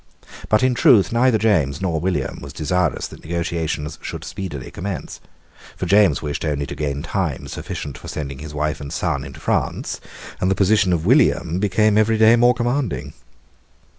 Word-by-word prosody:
But 110 +3 +3
in 130 -1 +3
truth 120 - +5
neither 120 0 +3
James 90 -11 +1
nor 85 -4 -1
William 80 -6 -2
was - - -9
desirous 90 +4 0
that - - -11
negotiations 80 -2 -3
should - - -6
speedily 80 -9 -6
commence; 95 -1 -5 0.6
for - - -3
James 100 0 +4
wished 75 0 -3
only 75 -2 -1
to - - -6
gain 70 -1 -3
time 80 -7 -2
sufficient 70 0 -6
for - - -11
sending 70 -3 -5
his 75 0 -8
wife 75 +1 -2
and 70 -1 -7
son - - -1
into - - -10
prance; - - -2 0.4
and 90 - +1
the 95 - +2
position 100 0 +3
of 85 -2 0
William 90 - +3
became 105 +2 +3
every 110 +1 +3
day 110 +1 +6
more 120 +1 +4
commanding. 120 - -2
90 Hz, 170 wpm, -21 LUFS, 75-110 Hz, 0.6 s, day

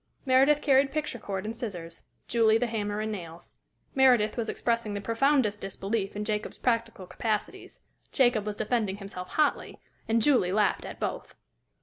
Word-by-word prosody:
Meredith 275 +3 +4
carried 275 -1 +4
picture 300 -5 -3
cord 195 -2 -4
and 225 +2 -4
scissors; 175 -8 -7 0.3
Julie 225 -2 +4
the 245 - 0
hammer 210 -2 -2
and 215 0 -2
nails. 170 -4 -8 0.4
Meredith 250 -6 +4
was 230 -2 -2
expressing 230 -3 -1
the - - -2
profoundest 230 0 +1
disbelief 195 +1 -3
in 210 +1 -3
Jacob's 210 0 -3
practical 230 -5 -1
capacities; 215 +2 -4 0.3
Jacob 245 -5 +3
was 210 0 -3
defending 210 -4 -1
himself 195 -3 -8
hotly; 305 -2 +1 0.3
and 225 +1 +2
Julie 230 -7 +3
laughed 210 0 +1
at - - -8
both. - - -4
220 Hz, 155 wpm, -28 LUFS, 205-245 Hz, 0.4 s, Meredith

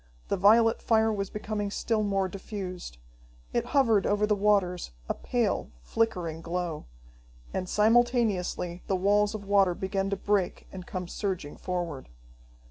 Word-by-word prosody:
The - - +2
violet 225 +4 +5
fire 220 -1 +3
was 195 -1 -2
becoming 210 -1 -3
still 220 +2 0
more 195 -2 +1
diffused. 185 - -7 0.6
It - - +1
hovered 230 -8 +3
over 205 +1 +2
the 210 0 +2
waters, 195 - +1
a - - 0
pale, 60 -1 -1
flickering 170 - -1
glow. 170 -2 -3 0.7
And 185 -1 -3
simultaneously 215 -6 +2
the 195 - +1
walls 205 +3 +2
of 200 -2 -7
water 195 -3 +3
began 195 +1 -2
to 200 - 0
break 195 -2 0
and 185 -1 -9
come 180 -2 -4
surging 185 -7 -3
forward. 175 -7 -4
195 Hz, 140 wpm, -28 LUFS, 180-210 Hz, 0.7 s, violet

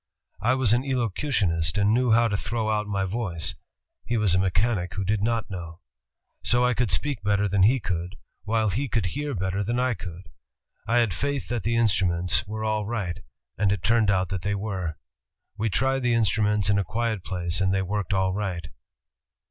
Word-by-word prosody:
I 125 +4 +3
was 125 -4 +3
an 120 +2 +2
elocutionist 110 - 0
and 100 +1 +3
knew 125 +1 +2
how 115 +1 +5
to 105 - -1
throw 110 +1 -1
out 105 -1 0
my 100 -2 -1
voice; 95 -5 -2 0.5
he 120 - -1
was 105 -5 +3
a 90 - +4
mechanic 95 0 0
who 95 -1 -2
did 105 +1 0
not 115 -1 -1
know. 85 -2 -7 0.6
So 120 +1 +3
I 125 - +3
could 125 -3 0
speak 130 +8 -1
better 105 0 +1
than 100 0 +1
he 120 +7 +5
could, 90 -2 -3 0.3
while 110 0 +1
he 130 +8 -2
could 110 -4 0
hear 145 +9 -3
better 95 +1 -1
than 120 +5 -1
I 130 0 +2
could. 90 -3 -9 0.6
I 115 +2 +2
had 115 -6 +3
faith 140 - -2
that 120 -2 -1
the 115 +4 0
instruments 95 -4 +2
were 110 +1 -4
all 110 -1 -1
right, 105 -7 -3 0.4
and 100 -1 +3
it 100 -4 -1
turned 115 -2 +3
out 95 -2 +1
that 95 -2 -3
they 100 +2 -1
were. 95 -6 -3 0.6
We 110 +1 -1
tried 135 +5 +1
the 120 -2 +2
instruments 105 -1 +2
in 100 -1 +3
a - - +1
quiet 110 +1 -2
place 90 -1 -2
and 95 -1 +2
they 95 0 +1
worked 100 0 -2
all 95 -1 +1
right." 95 -5 -3
105 Hz, 200 wpm, -25 LUFS, 95-115 Hz, 0.6 s, how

